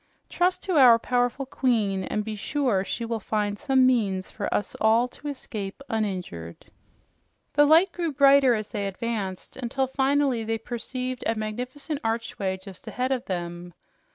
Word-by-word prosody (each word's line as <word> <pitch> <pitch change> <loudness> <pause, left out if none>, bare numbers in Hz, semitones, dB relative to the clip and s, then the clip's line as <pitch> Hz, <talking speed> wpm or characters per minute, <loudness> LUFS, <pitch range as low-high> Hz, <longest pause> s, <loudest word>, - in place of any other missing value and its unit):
"Trust 360 +1 +1
to 370 -5 0
our 245 -4 +8
powerful 245 +3 0
queen, 215 -8 0
and 210 - -2
be 220 -1 -4
sure 230 -3 0
she 230 +4 -4
will 230 -1 -2
find 210 -1 -2
some 270 -3 +3
means 205 -7 +1
for 205 - -4
us 205 - -1
all 225 +3 +4
to 295 - -10
escape 215 -8 -5
uninjured." 180 - -4 0.8
The 290 0 +6
light 335 +5 +6
grew 340 -3 -2
brighter 275 -2 +5
as 215 -1 -4
they 205 -3 -2
advanced, 195 -2 -4
until 265 +1 -1
finally 270 -2 +1
they 225 +1 -1
perceived 250 +2 -5
a 225 - +1
magnificent 250 +7 -4
archway 225 -4 -2
just 190 0 -13
ahead 255 +1 -2
of 255 -2 -1
them. 175 -1 -5
230 Hz, 155 wpm, -26 LUFS, 205-265 Hz, 0.8 s, our